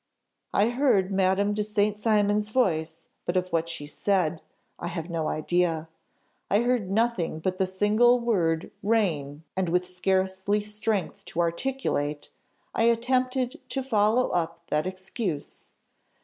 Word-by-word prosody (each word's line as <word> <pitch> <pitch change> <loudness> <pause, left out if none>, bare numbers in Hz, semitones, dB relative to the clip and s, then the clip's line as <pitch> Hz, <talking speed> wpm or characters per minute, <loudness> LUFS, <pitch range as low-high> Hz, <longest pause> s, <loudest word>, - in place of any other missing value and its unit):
"I 210 +3 +3
heard 240 -7 +2
Madame 195 +1 +2
de 210 0 0
St. 210 0 +1
Cymon's 210 -1 +2
voice, 165 -9 0 0.2
but 175 - -1
of 185 0 0
what 165 -1 0
she 165 -3 -5
said, 170 0 0 0.4
I - - -4
have 170 0 -5
no 160 -2 -1
idea. 165 0 0 0.6
I 205 +3 +4
heard 240 -6 +1
nothing 210 -6 +1
but 185 +4 -2
the 190 - +2
single 215 +6 +4
word 175 -9 0
'rain' 165 -9 0
and 190 -2 0
with 180 +1 +1
scarcely 190 +2 0
strength 210 -2 -3
to - - -5
articulate, 170 - -1 0.4
I 225 - +2
attempted 255 +3 +1
to 270 - -2
follow 225 0 +2
up 170 -1 -2
that 150 +4 +1
excuse. 185 - -5
190 Hz, 135 wpm, -27 LUFS, 170-220 Hz, 0.6 s, I